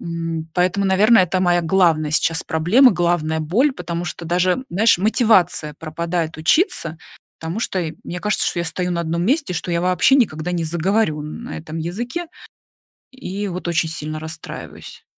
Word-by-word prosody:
М, 165 -1 -4
поэтому, 185 +2 +1
наверное, 200 +1 +5
это 185 +1 -1
моя 175 -1 +2
главная 165 -3 +2
сейчас 165 +1 +1
проблема, 205 - +4
главная 170 -3 0
боль, 230 - +2
потому 170 -6 -5
что 175 - -6
даже, 180 +8 +1
знаешь, 205 +1 +3
мотивация 190 - +2
пропадает 165 +1 -3
учиться, 165 - +1 0.4
потому 165 +7 -4
что 185 -5 -1 0.2
мне 180 +1 -6
кажется, 210 0 +1
что - - -1
я - - -2
стою 180 +2 -2
на 170 - -1
одном 170 +1 -2
месте, 280 - +1
что 175 0 -4
я 170 0 0
вообще 180 +8 +3
никогда 180 - +1
не 170 -2 -1
заговорю 170 0 0
на 225 +11 -7
этом 160 0 -8
языке, 240 - -4 0.8
и 205 -6 -5
вот 180 -1 -5
очень 165 -1 +1
сильно 155 -1 -5
расстраиваюсь. 160 +1 -9
175 Hz, 160 wpm, -20 LUFS, 160-200 Hz, 0.8 s, наверное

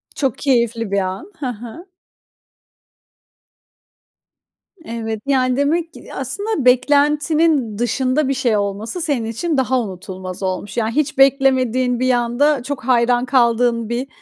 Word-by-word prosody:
Çok 270 -2 -1
keyifli 235 -6 0
bir 200 - +2
an, 190 - -4
hı 280 - -3
hı. 240 - -8 3.0
Evet, 225 -2 -4
yani, 255 -2 +1
demek 325 +4 0
ki, - - -12
ya, - - -12
aslında 410 - -3
beklentinin 290 -1 +2
dışında 255 +4 0
bir 275 - +1
şey 245 -5 +1
olması 205 - -3
senin 285 -8 -1
için 280 +8 -2
daha 260 0 +1
unutulmaz 185 -2 -7
olmuş. 190 +3 -4
Yani, 225 -1 0
hiç 300 -2 0
beklemediğin 260 -2 +3
bir 255 0 +2
anda 245 +3 +1
çok 280 -1 -5
hayran 245 0 +2
kaldığın 235 -3 +2
bir, 245 +3 -2
250 Hz, 130 wpm, -19 LUFS, 230-280 Hz, 3.0 s, beklemediğin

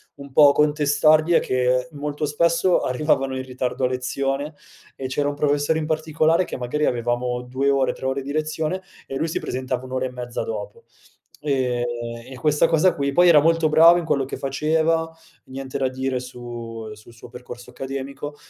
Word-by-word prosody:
un 140 -1 -11
po' 145 0 +7
contestargli, 150 +2 +3
è 170 - +6
che 125 +1 0
molto 150 +1 -3
spesso 170 +4 +2
arrivavano 135 0 0
in 130 - -4
ritardo 130 0 -2
a - - +3
lezione, 135 +3 -2 0.4
e 130 - -4
c'era 145 +2 -1
un 145 - -4
professore 145 +2 +1
in 155 - -3
particolare 160 +2 +1
che - - -6
magari 125 +5 -2
avevamo 120 +1 -1
2 130 +3 -1
ore 135 -1 +2
3 - - -9
ore 130 +1 -1
di 140 +2 -6
lezione 155 +3 -2 0.3
e 135 - -6
lui 160 +4 -1
si - - -2
presentava 130 0 -4
un'ora 130 0 -3
e 130 - -3
mezza 125 -1 -5
dopo 105 -2 -6 0.6
e 130 -4 0 0.5
e 130 - -9
questa 150 +3 +2
cosa 165 +3 +3
qui 140 -1 -1
poi 175 +4 +6
era 160 -3 +8
molto 165 0 +3
bravo 165 +3 +7
in 175 - -2
quello 140 -4 0
che 135 - -6
faceva, 160 +4 0 0.4
niente 135 0 -6
da 135 -1 +1
dire 130 0 -2
su 120 -3 -8
sul 110 +2 -16
suo 115 - -13
percorso 125 0 -10
accademico, 135 +3 -6
140 Hz, 180 wpm, -22 LUFS, 125-155 Hz, 0.6 s, era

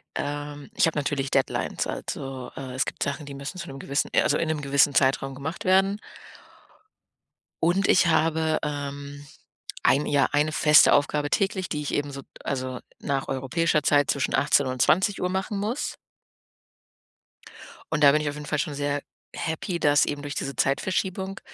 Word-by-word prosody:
Ähm, 145 0 -5
ich - - +4
habe 165 - -1
natürlich 140 -2 -2
Deadlines, - - 0
also, 135 -2 -5
äh, 130 -2 -6
es 130 - +1
gibt - - -4
Sachen, 140 +1 -3
die 140 - -8
müssen 140 +7 -7
zu 175 - -6
'nem 135 0 -8
gewissen, 140 +1 -1
äh - - +5
also, 145 - +2
in 165 - -1
'nem 155 -2 -1
gewissen 140 0 +3
Zeitraum 135 0 +2
gemacht 155 +5 -6
werden. 195 +2 +3 1.6
Und 180 +4 +3
ich 175 - +5
habe, 160 -1 +2
ähm, 145 0 -5 0.6
ein, 140 +2 +3
ja 145 -1 +3
eine 150 +1 +2
feste 155 -1 +6
Aufgabe 145 +1 +1
täglich, 195 -2 0
die 150 -2 -2
ich 145 - -4
eben 145 0 -1
so 140 0 -7 0.2
also, 130 -2 -3 0.2
nach 135 -1 -2
europäischer 150 +4 +1
Zeit 145 0 +3
zwischen 140 - 0
18:00 140 -2 +3
und 130 -1 -2
20:00 190 +1 +2
machen 195 +2 -2
muss. 220 +7 -2 2.0
Und 150 -1 +1
da 140 - +9
bin 150 +1 +2
ich 150 - -3
auf 145 - -6
jeden 150 0 -7
Fall 150 -1 -1
schon 150 -2 -2
sehr 145 0 -1 0.3
happy, 170 +2 -3
dass 145 -1 +4
eben 145 -1 -3
durch 145 0 -6
diese 140 - -4
Zeitverschiebung 190 +5 -1
145 Hz, 175 wpm, -25 LUFS, 140-165 Hz, 2.0 s, da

